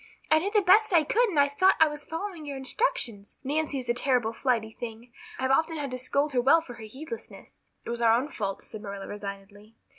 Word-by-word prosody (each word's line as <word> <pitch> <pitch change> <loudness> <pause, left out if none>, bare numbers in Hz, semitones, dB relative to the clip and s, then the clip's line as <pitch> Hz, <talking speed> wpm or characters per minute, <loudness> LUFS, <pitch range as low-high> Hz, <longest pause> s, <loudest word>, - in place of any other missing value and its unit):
I 315 - +6
did 400 +6 -3
the 420 -2 +4
best 420 +4 +5
I 330 -2 +6
could 470 +9 +2
and 320 -7 0
I 285 - +5
thought 370 +7 +3
I 320 - +7
was 295 -1 -6
following 335 +1 -5
your 285 -2 -5
instructions. 255 - -2
Nancy 290 +1 -1
is 255 -2 -5
a 240 - +2
terrible 245 -2 +1
flighty 230 -4 0
thing. 235 +1 -9 0.2
I've 260 0 0
often 320 +4 +2
had 285 -3 -4
to 255 - -4
scold 280 +3 0
her 250 - +3
well 275 +7 +6
for 290 -7 -10
her 225 -2 -10
heedlessness." 310 - -10 0.2
"It - - -4
was 235 0 -4
our 225 -1 +5
own 280 +4 -4
fault," 200 -8 -4
said 215 - -7
Marilla 200 -2 -7
resignedly. 205 +1 -9
265 Hz, 230 wpm, -27 LUFS, 225-315 Hz, 0.2 s, I